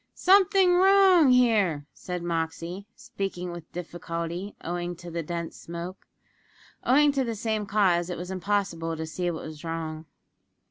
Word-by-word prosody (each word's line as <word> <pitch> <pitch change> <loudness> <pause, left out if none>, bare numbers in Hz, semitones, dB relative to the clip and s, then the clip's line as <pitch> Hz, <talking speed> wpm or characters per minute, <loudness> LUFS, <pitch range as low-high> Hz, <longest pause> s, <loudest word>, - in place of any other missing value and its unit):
"Something 380 -1 +5
wrong 380 -5 +6
here," 215 - +3
said 180 -1 -6
Moxey, 170 +3 -3
speaking 195 -7 -5
with 175 -2 -10
difficulty, 170 +2 -5
owing 175 +1 -3
to 175 0 -10
the 170 0 -2
dense 170 +1 -5
smoke. 170 +2 -8 0.8
Owing 290 +3 +5
to 275 -1 0
the 230 -2 -3
same 215 -1 -2
cause, 185 -4 +2
it 180 - -4
was 180 +2 -6
impossible 185 -4 -1
to 160 - -4
see 175 +3 -2
what 165 -2 -5
was 155 0 -9
wrong. 160 -1 -5
180 Hz, 145 wpm, -27 LUFS, 170-225 Hz, 0.8 s, wrong